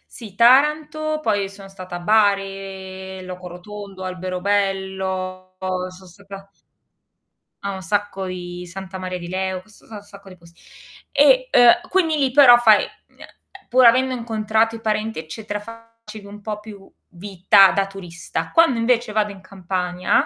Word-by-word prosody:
Sì 210 -5 -11
Taranto, 300 +5 +3
poi 205 -5 0
sono 195 0 -13
stata 185 -2 -9
a - - -5
Bari, 195 -2 -1
Loco 180 0 -8
Rotondo, 195 +2 -10
Alberobello, 185 0 -3
son 185 0 -5
stata 195 +2 -13 1.1
a 200 0 -3
un 190 - -7
sacco 200 0 -2
di 180 -1 -7
Santa 190 +1 -8
Maria 185 -1 -5
di 175 - -8
Leu 185 0 -3
so 215 -1 -20
sa 225 - -15
a - - -6
un 205 - -11
sacco 200 -1 -15
di 185 - -13
pos 170 -1 -19 0.6
e, - - +4
uhm, 345 +9 +5
quindi 330 -5 +1
lì 270 -3 +1
però 255 -3 +8
fai, 220 -3 +5
ehm, - - -5 0.8
pur 255 +1 +5
avendo 255 +2 +4
incontrato 225 -1 0
i 225 - -10
parenti, 215 -2 -2
eccetera, 205 +7 -6
facevi 230 -1 -13
un 205 +1 -11
po' 210 0 -5
più 205 -2 -13 0.2
vita 190 +1 +4
da 195 - +1
turista. 170 -4 -6
Quando 330 -8 +4
invece 240 -1 +1
vado 210 -1 0
in 195 -2 -13
Campania, 185 -1 -1
200 Hz, 155 wpm, -21 LUFS, 185-225 Hz, 1.1 s, però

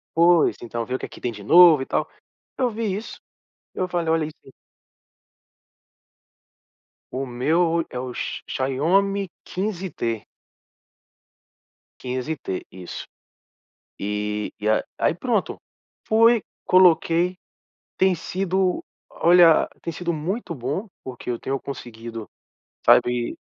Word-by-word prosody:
Pois, 170 0 +4
então, 115 0 -4
vê 125 - -5
o - - -3
que - - -5
aqui - - -12
tem 120 - -1
de 105 -2 -10
novo 165 - +8
e - - -3
tal. - - 0 0.5
Eu 255 -2 +2
vi 225 +1 -4
isso. 215 - -7 0.6
Eu 185 - -1
falei: 175 -2 -1
"Olha 160 -1 +2
isso 150 - -8
aí". 135 - -14 2.6
O 135 +1 -2
meu 130 +7 +1
o 170 -1 +1
é 125 - -5
o 125 -1 -6
x - - -4
Xiaomi 180 +9 +1 0.2
15T. 180 - -3 1.8
15T. 130 -4 -4
Isso. 90 -1 -8 0.9
E 105 +1 -3 0.2
a 110 - +2
aí, - - +2
pronto. 220 +2 -1 0.5
Fui. 230 0 +5 0.2
Coloquei. 175 0 +4 0.6
Tem 190 -1 +4
sido 185 +2 -1 0.3
olha, 170 -1 +5
tem 170 - -4
sido 170 0 -2
muito 170 +5 -3
bom, 145 - -3
porque 125 -1 -7
eu 120 - -2
tenho 135 +3 -2
conseguido, 115 -5 -8 0.6
sabe 120 -1 +4
160 Hz, 120 wpm, -23 LUFS, 125-185 Hz, 2.6 s, novo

